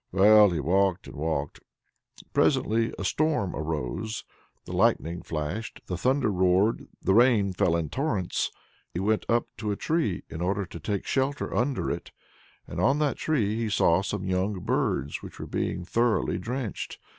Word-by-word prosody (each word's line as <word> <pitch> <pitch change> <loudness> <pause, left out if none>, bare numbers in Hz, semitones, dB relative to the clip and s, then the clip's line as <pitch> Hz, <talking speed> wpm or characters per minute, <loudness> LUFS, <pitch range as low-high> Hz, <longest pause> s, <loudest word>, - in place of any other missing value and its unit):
Well, 105 +2 +7
he 85 -3 -1
walked 95 +4 +1
and - - -10
walked. 75 -1 -2 0.7
Presently 115 +2 +2
a - - -4
storm 145 - 0
arose; 80 - -3 0.4
the - - -8
lightning 85 +2 +1
flashed, 80 +9 -4
the 90 - -3
thunder 130 +5 +1
roared, 95 +3 +2 0.2
the 95 - +3
rain 110 -4 +4
fell 90 -2 +2
in 85 -2 -1
torrents. 115 - -1 0.5
He - - -1
went 105 +3 0
up 120 0 +2
to 105 - -3
a - - 0
tree 155 - -1
in 80 - -7
order 95 +2 0
to 85 -1 -9
take 100 +5 -3
shelter 135 +2 -1
under 130 +2 0
it, - - -5 0.6
and 85 - -4
on 135 +9 +3
that 150 -2 0
tree 110 -10 0
he 115 -1 -1
saw 95 -3 +3
some 100 0 -3
young 95 +1 -1
birds 70 -4 -1
which - - -10
were - - -6
being 90 - -2
thoroughly 115 -4 +1
drenched. 115 +2 -4
100 Hz, 165 wpm, -27 LUFS, 90-115 Hz, 0.7 s, Well